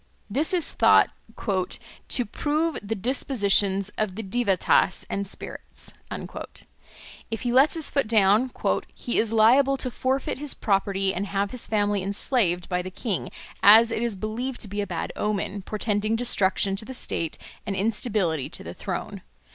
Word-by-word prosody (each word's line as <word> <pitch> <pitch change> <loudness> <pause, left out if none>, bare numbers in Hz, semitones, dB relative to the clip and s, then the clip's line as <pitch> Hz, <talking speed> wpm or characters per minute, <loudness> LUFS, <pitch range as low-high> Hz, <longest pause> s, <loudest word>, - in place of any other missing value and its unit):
This 290 +9 +1
is 355 -4 +2
thought - - +5 1.0
"to 245 - +2
prove 305 +8 -1
the 210 +2 -3
dispositions 200 -4 +1
of 210 -4 -1
the 225 - -5
Devattas 195 -3 +1
and 200 0 -2
spirits." - - -8 1.4
If 225 -1 -4
he 245 -1 -1
lets 270 +6 +5
his 320 -2 -1
foot 280 -5 +1
down 215 +3 +4 0.5
"he 240 - -2
is 225 -1 +1
liable 255 +5 +5
to 255 -1 -3
forfeit 260 +2 -1
his 295 -1 +3
property 195 -1 0
and 200 +3 -3
have 200 0 -1
his 250 - -3
family 205 -2 +1
enslaved 195 -2 0
by 180 -1 -1
the 185 - -6
king, 195 0 -3 0.3
as 225 +3 +8
it 230 - -1
is 235 -3 -1
believed 235 +6 -4
to 220 - -4
be 205 +1 -3
a 200 - -3
bad - - -4
omen, 205 -1 -2
portending 215 +1 -1
destruction 200 -4 +2
to 215 - -3
the 260 - -5
state, 165 -8 -2 0.3
and 200 - -2
instability 200 - 0
to - - -5
the - - -7
throne. - - -5
215 Hz, 160 wpm, -25 LUFS, 195-245 Hz, 1.4 s, as